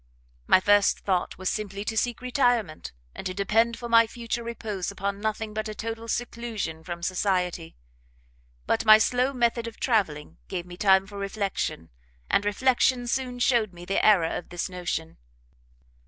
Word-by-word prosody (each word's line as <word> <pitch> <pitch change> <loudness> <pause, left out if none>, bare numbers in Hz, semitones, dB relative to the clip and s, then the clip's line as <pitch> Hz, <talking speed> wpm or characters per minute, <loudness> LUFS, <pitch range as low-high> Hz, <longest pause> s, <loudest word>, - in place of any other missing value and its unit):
"My - - +6
first 205 +1 +3
thought 185 -3 -1
was 185 - -5
simply 200 -1 -3
to 220 - -3
seek 240 +2 -1
retirement, 245 - 0 0.2
and - - -8
to 185 - -5
depend 225 +4 +2
for 240 - -6
my 230 -1 +6
future 235 0 -4
repose 220 -5 -4
upon 200 0 -4
nothing 215 0 -2
but 215 0 -3
a 215 - -6
total 225 +1 -5
seclusion 230 -9 -4
from 170 +1 -6
society: 180 -2 -1 0.9
but - - +1
my 215 -1 +9
slow 250 +4 +1
method 235 -2 0
of 230 - -9
travelling 185 - 0
gave 175 -2 -4
me 175 0 -10
time 190 0 +4
for 200 0 -9
reflection, 200 - -3 0.4
and 205 - +3
reflection 250 +3 +2
soon 250 0 -2
showed 235 -5 +2
me 175 0 -11
the 195 - 0
error 185 -7 +4
of - - -6
this 175 +1 -3
notion. 175 -3 -4
210 Hz, 165 wpm, -26 LUFS, 185-235 Hz, 0.9 s, my